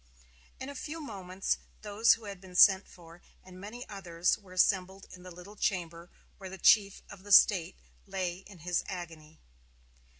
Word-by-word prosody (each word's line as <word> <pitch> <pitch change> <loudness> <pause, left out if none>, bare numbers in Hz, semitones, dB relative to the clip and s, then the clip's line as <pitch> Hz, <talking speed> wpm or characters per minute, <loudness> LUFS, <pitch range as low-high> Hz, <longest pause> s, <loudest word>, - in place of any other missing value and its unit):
In 260 - -6
a 280 - -7
few 300 +4 -7
moments 195 - -4 0.2
those 210 +2 +4
who 225 - -14
had 200 -2 -8
been 185 -1 -14
sent 190 +1 +6
for 170 -1 -16 0.2
and 185 0 -14
many 225 +5 -9
others 180 -4 -1
were 195 -3 -19
assembled 190 +1 +1
in 180 - -12
the 180 - -11
little 180 +4 -13
chamber 170 -4 -3 0.3
where 190 -2 -8
the 190 - -9
chief 200 +1 +3
of 195 - -12
the 205 +1 -10
state 190 -4 +5 0.3
lay 180 -2 -3
in 195 -2 -14
his 180 -1 0
agony. 165 -4 -9
190 Hz, 170 wpm, -30 LUFS, 180-205 Hz, 0.3 s, sent